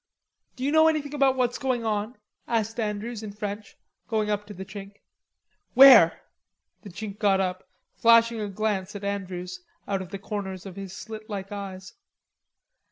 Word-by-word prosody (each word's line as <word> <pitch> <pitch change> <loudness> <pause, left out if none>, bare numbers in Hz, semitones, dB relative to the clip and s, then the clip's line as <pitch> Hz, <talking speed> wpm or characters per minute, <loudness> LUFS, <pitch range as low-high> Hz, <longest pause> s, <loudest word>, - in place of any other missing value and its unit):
"D'you 270 +2 -1
know 315 +1 +6
anything 300 -2 0
about 275 -2 +3
what's 250 -1 0
going 255 -4 -1
on?" 215 +3 -2 0.3
asked 225 0 -1
Andrews 215 +1 -3
in 215 -2 -6
French, 210 0 -6 0.3
going 215 -2 0
up 205 0 -2
to 210 - -8
the 190 +1 -7
Chink. 195 +1 -9 0.8
"Where?" 245 -11 +8 0.6
The 205 - -10
Chink 205 +2 -7
got 200 -3 +3
up, 185 -1 -3 0.2
flashing 230 -1 +4
a 205 - -3
glance 200 -1 -2
at 205 - -7
Andrews 185 - -4 0.3
out 195 -1 -1
of 185 - -8
the 200 - -5
corners 195 -2 -5
of 190 -2 -8
his 195 -1 -8
slit 220 0 -9
like 195 -1 -5
eyes. 190 -2 -7
210 Hz, 165 wpm, -26 LUFS, 195-230 Hz, 0.8 s, Where